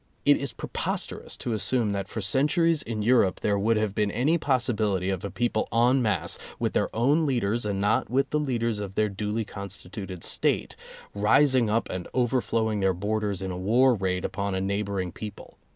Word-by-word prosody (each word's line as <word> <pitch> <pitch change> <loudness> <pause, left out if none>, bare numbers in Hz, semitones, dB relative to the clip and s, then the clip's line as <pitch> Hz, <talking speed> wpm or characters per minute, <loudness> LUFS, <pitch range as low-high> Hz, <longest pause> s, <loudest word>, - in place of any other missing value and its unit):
It 145 - +7
is 140 -3 -3
preposterous - - -4
to 120 - -3
as 110 - -2
sume 120 -5 +1
that 100 -1 -3
for 110 - -5
centuries 150 - +2
in 110 -4 -3
Europe 115 -5 +3
there 100 -1 +1
would 110 +2 +2
have 110 -2 0
been 105 0 +1
any 135 +10 +1
possibility 110 - +1
of 95 -2 -3
a 100 - -3
people 120 -1 -1
en 125 +3 +3
masse, 105 -7 0 0.2
(with - - -1
their - - +1
own 145 +8 +3
leaders, 120 -4 0
and 100 -1 -1
not 105 +2 +1
with 135 +3 +1
the 150 - +1
leaders 115 -6 -1
of 100 -2 -6
their 110 0 +2
duly 105 +3 -3
constituted 95 -2 -7
State), - - 0 0.4
rising 120 +3 +4
up 115 +2 +1
and 90 -1 -5
overflowing 115 -3 +1
their 95 -2 +2
borders 105 0 -2
in 95 - -3
a 90 - -4
war 120 +7 +4
raid 95 -3 -1
upon 100 0 -2
a - - 0
neighboring 100 -1 -2
people. 105 +2 -9
110 Hz, 190 wpm, -26 LUFS, 100-125 Hz, 0.4 s, It